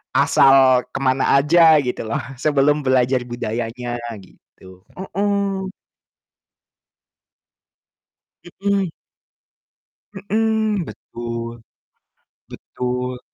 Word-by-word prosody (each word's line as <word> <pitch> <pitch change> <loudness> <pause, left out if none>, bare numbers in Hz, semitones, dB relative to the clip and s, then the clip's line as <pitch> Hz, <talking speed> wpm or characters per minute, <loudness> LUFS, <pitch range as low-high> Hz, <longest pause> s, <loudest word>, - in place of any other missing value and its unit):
asal 135 -2 +5
kemana 135 0 +2
aja, 160 +1 +5
gitu 125 -2 -3
loh, 140 +6 -2 0.2
sebelum 145 0 +2
belajar 130 0 +2
budayanya, 120 +1 -4 0.3
gitu, 95 0 -19
heeh. 195 0 -2 2.9
Mhm. 200 -3 0 1.2
Mhm, 215 0 -1
betul. 115 0 -7 0.9
Betul. 125 0 -5
135 Hz, 65 wpm, -20 LUFS, 125-190 Hz, 2.9 s, asal